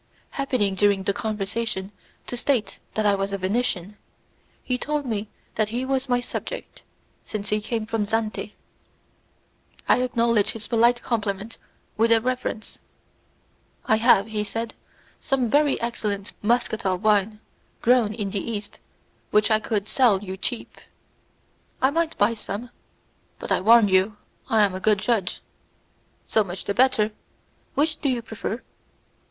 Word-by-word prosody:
Happening 255 -8 0
during 200 0 +2
the 200 - +1
conversation 210 -1 -3 0.3
to - - -5
state 240 -5 0 0.2
that 215 - +1
I 205 - +5
was 195 0 -1
a - - 0
Venetian, 200 -1 -1 0.7
he 250 - -1
told 295 +1 -1
me 215 -3 -3 0.2
that 215 -1 0
he 245 +3 -2
was 265 0 -1
my 245 0 +3
subject, - - -6 0.4
since 205 -2 -5
he 210 0 +1
came 225 0 -2
from 220 -2 -1
Zante. 215 -1 -2 1.3
I - - +4
acknowledged 235 -4 +2
his 220 -2 -5
polite 235 +1 +3
compliment 215 -1 -2 0.4
with 230 +1 +3
a 230 - +6
reverence. 250 -2 -3 1.1
"I 220 - +4
have," 220 -3 +5
he 215 -1 -2
said, 225 +2 -4 0.5
"some 255 -5 0
very 290 -1 +3
excellent 210 -4 -3
muscatel 220 -4 +1
wine 210 +1 +2 0.4
grown 240 -3 +4
in 205 -3 -3
the 200 - -1
East, 210 -3 -5 0.5
which 210 +1 +3
I 215 - +5
could 215 -2 -2
sell 215 -7 +3
you 190 -1 -5
cheap." 230 +5 -4 1.0
"I 265 +1 +3
might 330 +1 0
buy 205 +3 +3
some, 230 +2 -5 0.7
but - - -7
I - - +3
warn 225 +2 +7
you 190 +2 +2 0.3
I 220 -3 +5
am 200 -2 +2
a 185 - -4
good 210 +1 +3
judge." 200 -2 0 0.8
"So 220 - +2
much 185 -1 -6
the 200 - -1
better. 235 -2 +3 0.6
Which 310 +2 +1
do 280 - +1
you 245 -2 -1
prefer?" 225 +1 -5
220 Hz, 145 wpm, -24 LUFS, 205-240 Hz, 1.3 s, warn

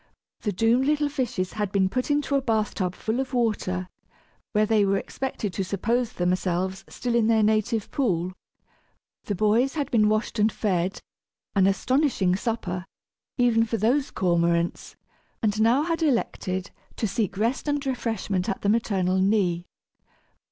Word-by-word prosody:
The 210 - -2
doomed 230 +7 +2
little 295 -1 +2
fishes 245 -9 -2
had 210 -3 -2
been 195 -2 +3
put 255 +8 -2
into 290 -1 +1
a 275 - +3
bath 220 -4 0
tub 185 -1 -2
full 220 +3 -2
of 260 -1 -3
water, 195 -6 0 0.6
where 210 0 +3
they 215 -1 +3
were 195 0 +2
expected 215 -4 -4
to 195 - -1
suppose 225 +5 -1
themselves 185 +1 -1
still 245 -1 -3
in 235 -2 +3
their 225 -1 +4
native 215 0 +1
pool. 185 - 0 0.9
The 205 - -2
boys 220 - +2
had 285 -3 -2
been 215 -3 +4
washed 215 +1 -1
and 215 +1 +4
fed 190 -3 -1 0.5
an 195 -1 +5
astonishing 210 -3 +2
supper, 190 -4 -3 0.5
even 240 -3 +4
for 230 0 -1
those 260 +6 +1
cormorants! 170 -1 0 0.5
and 215 0 +1
now 240 +6 +4
had 330 0 -1
elected 200 - -1 0.2
to 220 - -1
seek 200 -1 -2
rest 230 +8 0
and 290 -1 0
refreshment 225 -7 -2
at 195 - -3
the 200 - +2
maternal 190 -4 +1
knee. 185 -3 +1
215 Hz, 155 wpm, -25 LUFS, 190-245 Hz, 0.9 s, an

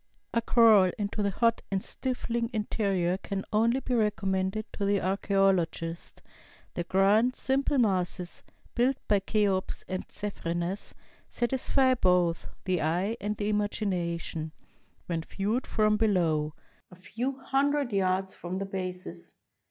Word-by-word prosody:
A 230 - +2
crawl 220 -5 +6
into 205 0 -2
the 200 - +1
hot 230 +4 +1
and 195 -1 -1
stifling 235 -3 -2
interior 195 -4 0
can 195 -1 -4
only 230 +5 +3
be 255 - -3
recommended 205 -2 0
to 205 - -4
the 200 0 +2
archaeologist. 190 -3 0 0.5
The 175 - -3
grand, 210 +7 +3
simple 275 +1 +1
masses, 185 -5 0 0.3
built 255 +2 +2
by 205 -1 +4
Cheops 195 -2 0
and 185 0 -4
Cephrenes, 180 -2 -3 0.3
satisfy 260 +1 +2
both 180 -7 +2 0.2
the 185 -2 +1
e3^e 180 +9 0
and 210 +1 -2
the 205 0 -1
imagination 175 -6 -2 0.5
when 165 -2 -2
viewed 205 +9 -2
from 215 -1 +2
below, 165 -8 +1 0.3
a 180 - -14
few 240 +9 -4
hundred 275 -1 0
yards 190 0 +1
from 175 +1 -5
their 195 - -2
bases. 185 -2 -6
200 Hz, 130 wpm, -28 LUFS, 180-225 Hz, 0.5 s, crawl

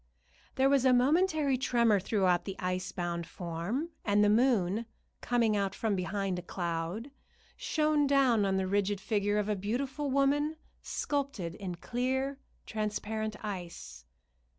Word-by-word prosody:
There 265 +1 +4
was 275 -2 +4
a 260 -1 +5
momentary 290 +1 +3
tremor 235 -5 +3
throughout 185 -3 +1
the 195 - -4
ice 185 0 -2
bound 170 -2 -3
form, 180 - -3
and 205 0 +3
the 210 - +4
moon, 220 -3 +2 0.3
coming 235 -3 +2
out 200 -1 -1
from 220 -3 0
behind 190 0 -2
a - - -6
cloud, 175 +7 -4 0.4
shone 305 -2 +1
down 265 -6 +4
on 195 -1 +1
the 190 - 0
rigid 200 +1 0
figure 205 0 0
of 210 -1 0
a 210 - +1
beautiful 260 +8 -2
woman 285 +3 +2 0.3
sculptured 275 - -2
in 185 -3 -5
clear, 265 +7 -2 0.3
transparent 215 0 -3
ice. 175 - -7
215 Hz, 140 wpm, -31 LUFS, 190-265 Hz, 0.4 s, a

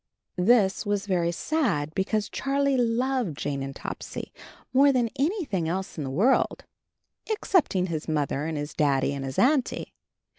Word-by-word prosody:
This 195 0 +4
was 205 -2 -1
very 175 -4 +1
sad, 175 - -1
because 205 +3 0
Charlie 275 0 0
loved 245 - 0
Jane 140 -2 -2
and 135 0 -5
Topsy - - -6 0.4
more 280 +2 +6
than 245 -4 +1
anything 275 - 0
else 190 +2 -3
in 155 - -4
the 135 - -4
world 205 - +2 0.6
excepting 360 - +2
his 165 -4 -4
Mother 150 -2 -1
and 160 -2 -3
his 145 +1 -4
Daddy 140 -2 +1
and 140 -1 -4
his 135 -1 -5
Auntie. 265 0 +1
190 Hz, 150 wpm, -26 LUFS, -, 0.6 s, more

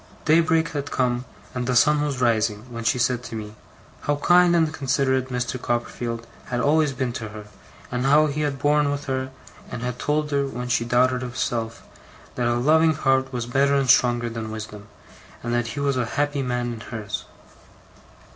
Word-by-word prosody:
'Daybreak 160 +1 +3
had 145 -2 -4
come, 125 -1 0 0.3
and 125 -1 -3
the 125 - +1
sun 150 +4 +4
was 145 -3 -2
rising, 110 -3 +1
when 115 0 -5
she 120 +2 +2
said 125 0 +1
to 115 -2 -8
me, 105 -1 -6 0.5
how 145 - +3
kind 175 +3 +4
and 160 -2 +2
considerate 130 -2 0
Mr. 125 0 -3
Copperfield 120 -1 -3 0.2
had 120 - -2
always 150 +3 +3
been 130 -2 -2
to 110 -2 -5
her, 105 0 -9 0.5
and 125 +1 -1
how 150 +2 +6
he 150 0 -2
had 145 -2 -1
borne 145 +1 +2
with 145 0 -3
her, 130 -1 -2 0.4
and 120 -1 -6 0.2
told 150 0 0
her, 140 -1 +1
when 125 -2 -5
she 115 -1 +2
doubted 125 +1 +2
herself, 115 -2 -3 0.5
that 120 -1 -1
a 120 - +2
loving 160 +5 +4
heart 135 -2 +1
was 120 -2 -3
better 140 +3 +2
and 135 -2 +4
stronger 120 -1 +3
than 115 -1 -5
wisdom, 105 -1 -8 0.6
and 120 0 -2
that 120 -1 0
he - - -1
was 140 -2 0
a 125 - +1
happy 145 -1 +1
man 120 -2 -2
in 115 - -8
hers. 110 -1 -6
125 Hz, 185 wpm, -23 LUFS, 120-145 Hz, 0.6 s, how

